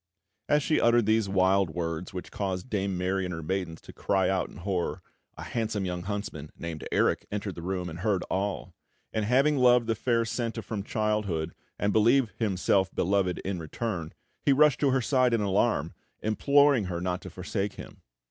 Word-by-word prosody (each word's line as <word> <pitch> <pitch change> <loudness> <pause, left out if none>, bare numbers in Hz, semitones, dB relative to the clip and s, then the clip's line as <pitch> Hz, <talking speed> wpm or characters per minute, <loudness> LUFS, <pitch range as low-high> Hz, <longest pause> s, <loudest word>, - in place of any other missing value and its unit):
As 150 0 +3
she 155 - +2
uttered 120 -1 +4
these 110 -1 +2
wild 95 -1 +3
words, 85 +1 -4
which 90 -1 -7
caused 95 +4 -3
Dame 100 -3 -1
Mary 95 +1 0
and 90 - -3
her 80 -2 -5
maidens 90 -1 -3
to - - -12
cry 95 -2 +1
out 95 -1 0
in - - -13
horror, 90 -1 -2 0.3
a - - -7
handsome 110 -4 -2
young 90 -1 -3
huntsman, 95 -6 -5
named 85 -2 -6
Erik, - - +1
entered 100 -1 -3
the 85 - -8
room, 90 0 -3
and 85 0 -7
heard 100 -1 0
all; 95 -2 -3 0.4
and 110 -1 0
having 135 +6 +3
loved 125 -1 +5
the 115 - +1
fair 115 +1 +1
Senta 115 -1 -3
from 105 -3 -4
childhood, 105 -6 -1 0.2
and 100 0 0
believed 115 +2 +4
himself 95 -3 +2
beloved 95 -1 +1
in 95 -2 -2
return, 85 0 -4 0.3
he - - +4
rushed 145 -1 +5
to 140 - +3
her 130 0 +2
side 125 -1 +3
in 115 - 0
alarm, 100 -4 +1 0.3
imploring 140 +2 +4
her 90 -2 -3
not 90 0 -2
to - - -8
forsake 95 +2 -3
him. - - -11
100 Hz, 185 wpm, -28 LUFS, 90-115 Hz, 0.4 s, loved